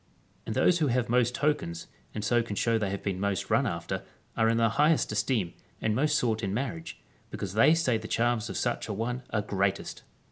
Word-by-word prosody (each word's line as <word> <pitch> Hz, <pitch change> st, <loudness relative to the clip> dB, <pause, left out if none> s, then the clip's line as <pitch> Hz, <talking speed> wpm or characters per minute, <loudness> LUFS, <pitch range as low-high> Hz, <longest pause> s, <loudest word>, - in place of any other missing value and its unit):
And -, -, -3 dB
those 175 Hz, -, +4 dB
who 155 Hz, -, +2 dB
have 125 Hz, -2 st, 0 dB
most 125 Hz, 0 st, +2 dB
tokens, 85 Hz, -, -1 dB, 0.3 s
and 105 Hz, -1 st, -3 dB
so 120 Hz, +2 st, +3 dB
can 115 Hz, -3 st, -5 dB
show 115 Hz, +2 st, +2 dB
they 105 Hz, -3 st, -1 dB
have 100 Hz, 0 st, -4 dB
been 95 Hz, -2 st, -2 dB
most 100 Hz, -1 st, -1 dB
run -, -, +3 dB
after, 85 Hz, +3 st, -3 dB, 0.3 s
are 110 Hz, 0 st, +3 dB
in 115 Hz, -, +2 dB
the 115 Hz, 0 st, +4 dB
highest 150 Hz, +5 st, +2 dB
esteem, 105 Hz, -4 st, 0 dB, 0.3 s
and 110 Hz, -, 0 dB
most 150 Hz, +4 st, +2 dB
sought 110 Hz, -2 st, 0 dB
in 100 Hz, -1 st, -2 dB
marriage, 110 Hz, -11 st, -4 dB, 0.3 s
because 95 Hz, -2 st, -5 dB
they 115 Hz, +9 st, +6 dB
say 130 Hz, -9 st, +1 dB
the 110 Hz, -, -7 dB
charms 120 Hz, -1 st, 0 dB
of -, -, -4 dB
such -, -, -1 dB
an 105 Hz, -, -3 dB
one 120 Hz, +3 st, -2 dB
are 105 Hz, -2 st, -1 dB
greatest. 100 Hz, -1 st, -1 dB
110 Hz, 215 wpm, -28 LUFS, 100-125 Hz, 0.3 s, they